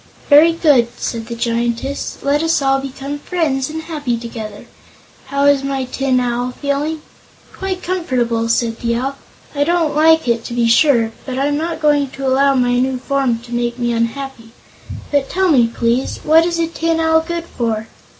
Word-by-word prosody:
"Very 310 +3 +7
good," 290 -8 +3
said 225 -2 -4
the 235 - -5
Giantess. 235 +3 -2
"Let 285 +1 +1
us 325 0 +2
all 270 -1 +2
become 275 +2 -6
friends 290 -6 -1
and 320 +1 -5
be - - -14
happy 290 -7 -2
together. 220 -3 -8 0.6
How 280 +1 0
is 285 -1 +4
my 275 -1 -2
Tin 260 0 0
Owl 245 0 -2
feeling?" 295 +2 -2 0.5
"Quite 380 -1 -4
comfortable," 245 -11 -1
said 230 -1 0
the 235 0 -1
Owl. 265 +3 -2 0.4
"I 285 -1 +1
don't 330 -1 +1
like 320 -1 +4
it, 235 -1 +1
to 240 - -5
be 235 -1 +2
sure, 235 -2 +4
but 260 -1 -5
I'm 285 +2 +1
not 325 +1 -3
going 290 -2 +3
to 270 - -4
allow 275 +1 +3
my 245 -1 +2
new 260 0 0
form 265 -2 0
to 240 0 -10
make 240 0 -1
me 240 -1 -1
unhappy. 230 0 -4 0.6
But, 285 -2 +1
tell 375 -1 +1
me, 245 -6 +5
please: 235 +2 -1
what 325 +2 +5
is 340 -1 -2
a 335 - +1
Tin 330 0 -1
Owl 320 0 +3
good 340 +1 -4
for?" 225 -7 -3
270 Hz, 185 wpm, -17 LUFS, 240-310 Hz, 0.6 s, Very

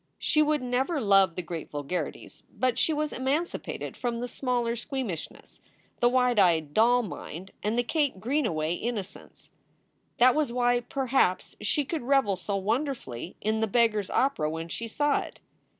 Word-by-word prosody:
She 305 - +2
would 300 -2 +2
never 260 +6 0
love 195 -6 +4
the 180 - -3
great 165 -1 -6
vulgarities, 145 +5 -5
but 255 -1 0
she - - +3
was 305 0 -1
emancipated 280 +7 -2
from 240 -2 -2
the 245 - -3
smaller 240 -2 -1
squeamishness, 240 - -6 0.4
the 240 - +4
wide 250 -2 +3
eyed 160 -6 +3
doll 240 +3 +4
nrnd, 185 -2 -7
and 215 +3 -1
the 245 - +3
Kate 285 - 0
Greenaway 215 - 0
innocence. 210 0 -6 0.7
That 250 +1 +6
was 300 -5 0
why, 245 0 +2
perhaps, 255 -6 0
she 295 -2 0
could 320 +3 -3
revel 250 -6 +2
so 185 +2 -3
wonderfully 205 - -2
in 220 +1 0
"The 220 - +1
Beggar 225 0 +3
s 200 - -5
Opera" 260 - +1
when 165 +1 -5
she 230 +6 -4
saw 290 +5 +1
it. - - -8
240 Hz, 165 wpm, -28 LUFS, 190-265 Hz, 0.7 s, That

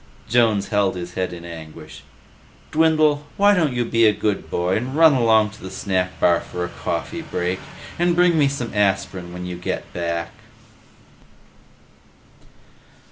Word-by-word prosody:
Jones 110 -4 +2
held 100 -2 +1
his 90 0 -6
head 90 -1 -2
in 85 -1 -9
anguish. 80 -2 -10 0.7
"Dwindle, 155 -2 +2
why 205 +1 +5
don't 165 -7 +2
you 120 -1 -1
be 115 -1 +3
a - - +6
good 105 -1 -2
boy 90 +2 0
and 125 +5 -4
run 160 -1 +6
along 110 -4 +3
to 105 - -15
the 95 - -7
snack 90 -1 -2
bar 85 -1 +4
for 90 0 -5
a - - -7
coffee 85 - -4
break? 90 - -3 0.4
And 175 0 +2
bring 175 -1 +4
me 150 -3 +4
some 130 -4 -4
aspirin 95 -3 0
when 90 0 -7
you 90 -1 -6
come 90 - -3
back." 85 -1 -3
105 Hz, 155 wpm, -21 LUFS, 90-140 Hz, 0.7 s, a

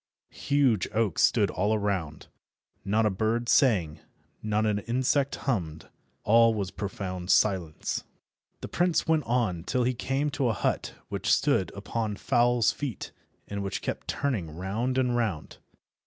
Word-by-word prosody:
Huge 140 -8 +3
oaks 110 -6 +1
stood - - +3
all 105 +4 +1
around. 95 -7 -2 0.6
Not 105 +3 +1
a 105 - +2
bird 110 +5 -1
sang, 95 - +3 0.4
not 110 0 0
an 105 -1 +1
insect 130 +5 0
hummed, 85 - -3 0.3
all 115 +1 +5
was 100 -3 -3
profound 95 -2 -5
silence. 90 -8 +1 0.6
The - - -5
prince 175 -1 +1
went 160 -4 +2
on 115 -9 0
till 125 +6 0
he 125 +1 +1
came 135 +4 -1
to 135 - 0
a 115 - +1
hut - - -2
which - - -1
stood - - +2
upon 110 -3 -3
fowl's 120 +1 +2
feet, 135 -8 -5 0.4
and 100 0 -4
which 95 -1 -4
kept - - -4
turning 110 - -2
round 110 +9 -2
and 125 -2 +1
round. 105 -10 -2
110 Hz, 145 wpm, -27 LUFS, 95-125 Hz, 0.6 s, all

